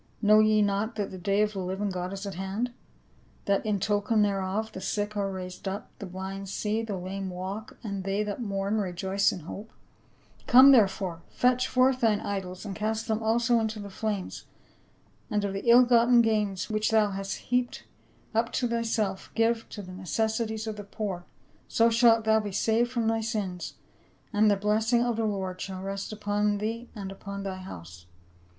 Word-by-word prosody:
Know 215 0 +6
ye 215 -1 +4
not 205 +2 0
tliat 205 -2 -3
the 185 - -7
day 200 +3 +2
of 210 0 -1
the 195 - -4
living 190 +2 -2
God 180 0 -3
is 195 +1 -6
at 200 - -4
hand? 195 +7 -3 0.7
That 200 -1 +2
in 210 -2 0
token 210 +2 +2
thereof 200 +2 -1
the 190 - -8
sick 205 +2 -2
are 200 -1 -1
raised 185 0 -7
up, 195 +2 -5
the 200 - -6
blind 190 +1 -6
see, 215 +3 -1
the 215 -4 -4
lame 190 +1 -4
walk, 190 +6 -6
and 200 -3 -4
they 195 +2 0
that 210 +3 -4
mourn 200 0 -1
rejoice 190 +1 +1
in 180 - -6
hope? 200 +7 -8 0.8
Come, 260 +3 +9
therefore, 195 -8 +3
fetch 250 0 +2
forth 255 0 +3
thine 220 -3 +3
idols 190 -2 -4
and 195 -2 -5
cast 220 +1 -2
them 220 0 0
also 230 +2 +3
into 220 -1 -2
the 200 -1 -7
flames, 205 -2 -4 0.8
and 210 -2 0
of 195 - -2
the 195 +4 -2
ill 245 +2 +9
gotten 240 0 +5
gains 210 -4 0
which 215 0 0
thou 215 -2 +3
hast 195 0 -4
heaped 245 0 0 0.5
up 230 +1 +1
to 245 - +1
th}'self 225 -4 -1
give 230 0 +1
to 205 - -7
the 185 - -10
necessities 220 +4 -2
of 215 -1 -4
the 205 - -6
poor; 195 -3 -5 0.4
so 230 0 +3
shalt 230 -1 +5
thou 220 0 +4
be 210 -2 -4
saved 225 +4 +2
from 235 -3 0
thy 225 0 +1
sins, 205 -6 -3 0.6
and 210 +1 +4
the 205 - +4
blessing 220 +4 +2
of 240 -1 0
the 225 - +1
Lord 190 -3 -3
shall 190 -1 -5
rest 195 +1 -4
upon 205 0 0
thee 225 +3 -4
and 195 -2 -6
upon 200 0 -7
thy 190 -1 -4
house." 85 - -10
210 Hz, 190 wpm, -28 LUFS, 195-225 Hz, 0.8 s, Come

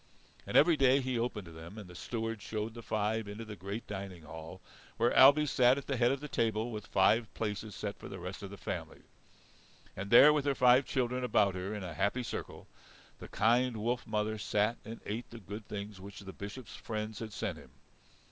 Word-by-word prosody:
And - - +2
every 165 +2 +6
day 135 0 +5
he 130 -3 -1
opened 115 -4 -2
to 85 - -11
them, 80 +5 -10
and 105 -3 -8
the 90 - -12
steward 115 +3 -4
showed 110 +1 -4
the 115 - -8
five 110 0 -1
into 105 +3 -7
the 105 -1 -7
great 100 +5 -6
dining 95 -4 -7
hall 80 +3 -9 0.4
where 120 +1 +3
Ailbe 145 +3 +8
sat 125 -1 +4
at 140 - -5
the 135 - -1
head 120 0 +3
of 135 0 -2
the 150 - -5
table, 115 -2 0
with 105 -2 -6
five 105 +4 +3
places 105 -1 -3
set 105 -1 -5
for - - -9
the 95 - -7
rest 90 +4 -7
of 100 - -6
the 100 - -9
family. - - -6 0.9
And 95 +2 -5
there, 140 +6 +9
with 145 -2 0
her 140 -1 +2
five 125 +1 +5
children 125 0 0
about 105 -5 +3
her 95 +3 -4
in 105 - -5
a 90 -3 -5
happy 100 +10 0
circle, 115 - -6 0.5
the - - -9
kind 120 +3 +2
wolf 120 +3 -2
mother 110 0 -1
sat 105 +3 +1
and 115 +1 -8
ate 110 +4 -4
the 115 - -10
good 105 0 -8
things 100 -1 -6
which 100 +1 -9
the 95 -1 -9
Bishop's 100 +3 -8
friends 110 -1 -5
had 110 -1 -6
sent 100 -5 -4
him. 70 - -15
110 Hz, 215 wpm, -32 LUFS, 100-120 Hz, 0.9 s, there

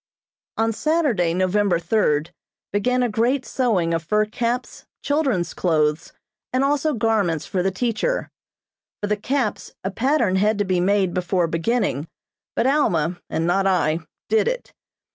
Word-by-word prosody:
On 225 0 +1
Saturday, 255 - +1
November 185 0 +2
third, 165 -4 +1 0.4
began 250 +5 +1
a - - +2
great 240 +5 0
sewing 200 -10 +1
of 165 - 0
fur 210 +6 +2
caps, 235 +3 -3 0.2
children's 270 - 0
clothes, 155 -2 0 0.4
and 255 +1 +1
also 290 +2 +1
garments 205 -8 +1
for 185 - -1
the 190 - +1
teacher. 240 - -1 0.7
For - - -2
the 210 +1 +1
caps, 240 +1 -2
a 190 - -2
pattern 245 -4 +1
had 210 +2 +2
to 205 - 0
be 185 -1 +1
made 190 0 +2
before 180 0 +1
beginning, 165 - -1 0.5
but 230 - +1
Alma 180 - +1
and 165 - -1
not 195 +3 +2
I 165 -4 +2 0.3
did 220 0 +2
it. - - -3
205 Hz, 145 wpm, -22 LUFS, 175-245 Hz, 0.7 s, November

